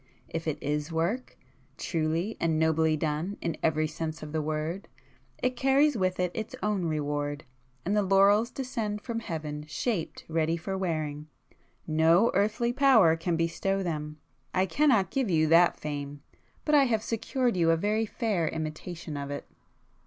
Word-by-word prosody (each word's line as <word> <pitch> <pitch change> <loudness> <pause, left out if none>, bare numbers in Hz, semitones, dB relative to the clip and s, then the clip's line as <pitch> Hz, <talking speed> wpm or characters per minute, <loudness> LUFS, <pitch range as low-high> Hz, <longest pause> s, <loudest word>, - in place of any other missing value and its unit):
If 165 0 -5
it 155 -2 -1
is 150 +2 -2
work, 175 +11 -2 0.4
truly 165 +5 -1
and 160 -2 +1
nobly 160 0 +2
done 155 +6 -2
in 165 -2 -2
every 155 -1 +2
sense 160 0 -5
of 150 - -7
the 160 0 -1
word, 155 +5 -3 0.6
it 255 0 +1
carries 270 +3 +3
with 185 -3 0
it 180 -1 +1
its 220 -1 -5
own 205 -4 0
reward, 145 -1 -2 0.4
and 200 +4 +1
the 210 - +4
laurels 200 +4 +4
descend 230 -6 -3
from 235 -2 -3
heaven 155 -6 -5
shaped 180 +2 -3
ready 165 0 0
for 190 +4 -4
wearing,—no 160 - 0
earthly 215 +5 +1
power 245 - +5
can 165 +1 -1
bestow 180 +4 0
them. 150 -3 -4 0.4
I 185 +1 +3
cannot 230 -3 +2
give 265 -6 0
you 160 -3 +3
that 170 +2 +5
fame,—but 145 - -6
I 285 -2 +6
have 220 -4 0
secured 240 +1 -1
you 170 -2 +3
a 165 - +4
very 215 +5 0
fair 205 -8 -1
imitation 160 +1 -5
of 140 0 -4
it." 145 - -5
170 Hz, 155 wpm, -28 LUFS, 155-210 Hz, 0.6 s, I